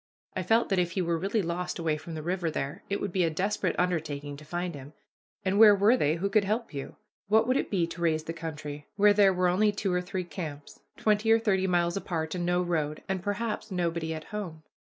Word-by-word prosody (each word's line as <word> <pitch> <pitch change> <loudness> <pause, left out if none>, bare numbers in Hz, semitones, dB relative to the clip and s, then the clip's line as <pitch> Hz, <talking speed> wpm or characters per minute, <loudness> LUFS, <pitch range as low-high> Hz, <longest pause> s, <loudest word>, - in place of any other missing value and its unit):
I 185 - -1
felt 225 +6 +2
that 195 -2 +2
if 175 0 0
he 190 - 0
were 170 -1 0
really 200 +4 0
lost 175 +1 -3
away 165 -3 0
from 155 +2 -8
the 155 - -5
river 175 0 -1
there, 140 -2 -4
it 200 - -1
would 200 - -3
be 185 0 +2
a 165 - +2
desperate 195 +7 -1
undertaking 150 -5 -1
to 155 - -12
find 175 +3 -3
him; 140 +1 -10 0.5
and 195 +2 +2
where 215 -2 +9
were 205 +5 +5
they 155 - +2
who 180 +4 -1
could 205 +1 +3
help 215 0 -2
you? 140 -1 -6 0.3
What 220 +3 +4
would 255 - +2
it - - 0
be 180 -5 +1
to 170 +1 -8
raise 160 -2 +1
the 165 - -5
country, 150 -3 -7
where 205 0 +6
there 200 -1 +5
were 180 -1 +1
only 205 +4 +3
two 200 -2 -2
or 180 - +1
three 185 0 -3
camps, 155 -5 -7 0.2
twenty 215 +1 +2
or 225 - +7
thirty 195 -4 +1
miles 175 0 +1
apart, 160 -5 -3
and 175 -1 -2
no 175 0 +2
road, 155 -4 -2
and 190 -1 -2
perhaps 215 +3 -3
nobody 170 -3 -1
at 155 -1 -4
home? 175 -7 -5
180 Hz, 235 wpm, -28 LUFS, 160-200 Hz, 0.5 s, where